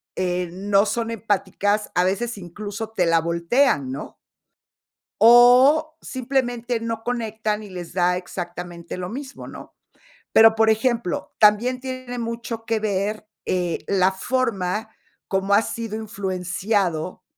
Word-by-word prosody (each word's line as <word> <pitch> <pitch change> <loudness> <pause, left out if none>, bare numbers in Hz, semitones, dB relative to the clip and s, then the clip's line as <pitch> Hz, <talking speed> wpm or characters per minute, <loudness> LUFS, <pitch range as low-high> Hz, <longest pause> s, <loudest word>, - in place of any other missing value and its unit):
eh, 180 -1 -1
no 200 +2 +2
son 230 +1 -2
empáticas, 205 -1 -1
a 180 - +4
veces 210 +5 -1
incluso 205 +4 -6
te 185 -5 +1
la 165 -1 +3
voltean, 170 - +1
¿no? 135 - -7 1.0
O 255 +7 +6
simplemente 245 -2 -2
no 230 0 -4
conectan, 220 -3 -2
y 205 - -10
les 180 -3 -8
da 180 0 +2
exactamente 175 -1 -7
lo 180 0 -5
mismo, 270 +3 -8
¿no?, - - -11 0.6
pero, 225 0 +7
por 225 0 +3
ejemplo, 225 -3 0
también 230 +5 +4
tiene 255 -2 -6
mucho 230 -1 -5
que 225 -1 +1
ver, 210 0 -2 0.2
eh, 180 -2 0
la 190 -1 +3
forma 220 -2 -1 0.4
cómo 195 +1 +1
ha 210 - +5
sido 225 -2 -4
influenciado, 190 -4 -2
215 Hz, 130 wpm, -23 LUFS, 185-235 Hz, 1.0 s, pero